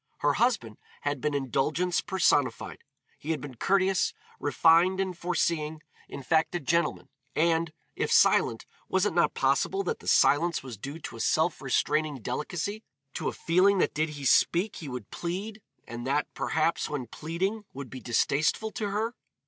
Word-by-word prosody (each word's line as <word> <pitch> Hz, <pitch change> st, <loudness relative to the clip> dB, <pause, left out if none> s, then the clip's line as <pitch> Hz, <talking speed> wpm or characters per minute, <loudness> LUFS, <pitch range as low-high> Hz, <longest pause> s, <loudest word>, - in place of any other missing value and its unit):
Her 145 Hz, 0 st, +3 dB
husband 205 Hz, -, 0 dB, 0.2 s
had 145 Hz, -2 st, -2 dB
been 150 Hz, 0 st, 0 dB
indulgence 145 Hz, +6 st, 0 dB
personified. 160 Hz, -7 st, +1 dB, 0.4 s
He 150 Hz, -, -8 dB
had 160 Hz, -2 st, 0 dB
been 135 Hz, 0 st, -8 dB
courteous, 190 Hz, +8 st, +1 dB, 0.2 s
refined 170 Hz, +5 st, +4 dB
and 190 Hz, -2 st, -1 dB
foreseeing, 160 Hz, -3 st, -1 dB, 0.3 s
in 140 Hz, -, -7 dB
fact 160 Hz, +5 st, +1 dB
a -, -, 0 dB
gentleman, 170 Hz, +3 st, 0 dB, 0.3 s
and, 165 Hz, 0 st, +2 dB, 0.2 s
if -, -, -1 dB
silent, -, -, +4 dB, 0.2 s
was -, -, +2 dB
it -, -, 0 dB
not -, -, +2 dB
possible 390 Hz, 0 st, +1 dB
that 455 Hz, -, -2 dB
the -, -, -13 dB
silence 170 Hz, +3 st, +3 dB
was 130 Hz, -3 st, -7 dB
due 140 Hz, +9 st, -7 dB
to 115 Hz, -, -7 dB
a -, -, -10 dB
self 160 Hz, +7 st, +1 dB
restraining 145 Hz, +2 st, 0 dB
delicacy, 175 Hz, -, -3 dB, 0.3 s
to -, -, -3 dB
a -, -, -4 dB
feeling 185 Hz, +4 st, +3 dB
that -, -, +1 dB
did 155 Hz, +1 st, 0 dB
he 140 Hz, -, -6 dB
speak 180 Hz, +9 st, +3 dB
he 150 Hz, -, -7 dB
would 125 Hz, -5 st, -7 dB
plead, 200 Hz, +5 st, -5 dB, 0.3 s
and 120 Hz, +2 st, -6 dB
that, 145 Hz, +2 st, +1 dB
perhaps, 160 Hz, +1 st, 0 dB
when 140 Hz, -4 st, -3 dB
pleading 185 Hz, -, -3 dB
would 135 Hz, -2 st, -8 dB
be 130 Hz, -, -7 dB
distasteful 145 Hz, -, +1 dB
to 210 Hz, -2 st, -3 dB
her? 220 Hz, +4 st, -1 dB
160 Hz, 165 wpm, -28 LUFS, 140-185 Hz, 0.4 s, refined